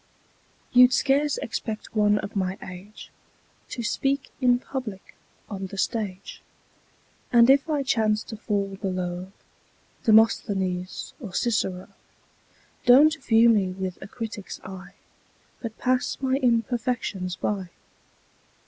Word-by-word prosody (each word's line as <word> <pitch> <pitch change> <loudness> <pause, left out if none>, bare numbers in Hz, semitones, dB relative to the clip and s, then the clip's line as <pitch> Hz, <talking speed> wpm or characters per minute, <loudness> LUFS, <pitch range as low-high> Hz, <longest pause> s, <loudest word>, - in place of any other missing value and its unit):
YOU'D 250 0 +7
scarce 285 +2 +2
expect 220 -1 -5
one 210 -1 +4
of 210 0 -5
my 190 -1 -1
age 185 +4 -11 0.6
To 240 - -5
speak 270 +4 -1
in 245 -1 +4
public 245 -7 -7 0.3
on 195 -2 -5
the 195 - -9
stage, 200 -3 -3 0.9
And 235 +1 +7
if 280 +3 +3
I 295 -2 +1
chance 215 -4 +1
to 220 - -8
fall 200 -3 -2
below 185 -1 -3 0.7
Demosthenes 195 -5 +2
or 195 -7 -7
Cicero, 190 -6 -1 1.0
Don't 290 +6 +7
view 230 0 +5
me 200 -5 +3
with 185 -1 -5
a 195 - -8
critic's 215 -2 -7
eye, 190 0 -10 0.7
But 225 -2 -6
pass 255 0 0
my 265 -1 +1
imperfections 230 -6 0
by. 190 -1 -3
215 Hz, 115 wpm, -25 LUFS, 190-245 Hz, 1.0 s, YOU'D